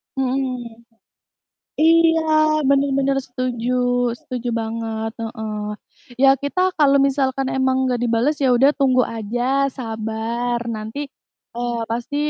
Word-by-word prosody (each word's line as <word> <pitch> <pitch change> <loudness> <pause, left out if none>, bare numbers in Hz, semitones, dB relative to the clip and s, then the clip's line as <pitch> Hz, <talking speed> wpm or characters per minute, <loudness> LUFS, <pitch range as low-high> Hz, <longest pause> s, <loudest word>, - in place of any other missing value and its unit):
Mhm. 250 -3 -3 1.0
Iya, 325 0 +5 0.5
benar 280 0 +3
benar 275 0 +1
setuju 250 -1 -3 0.5
setuju 245 -1 -5
banget, 225 0 -3
heeh. 220 -2 -5 0.6
Ya 270 - +7
kita 285 +6 -1 0.2
kalau 280 -2 +5
misalkan 270 -1 0
emang 260 0 +2
nggak 250 -2 0
dibalas, 240 +5 +1
ya - - +4
udah 270 +4 +5
tunggu 255 -2 +3
aja, 225 +2 -3 0.3
sabar, 225 +1 -3 0.2
nanti, 220 +6 -7 0.6
eee, 240 0 -2
pasti 240 +5 -3
245 Hz, 110 wpm, -21 LUFS, 230-270 Hz, 1.0 s, Ya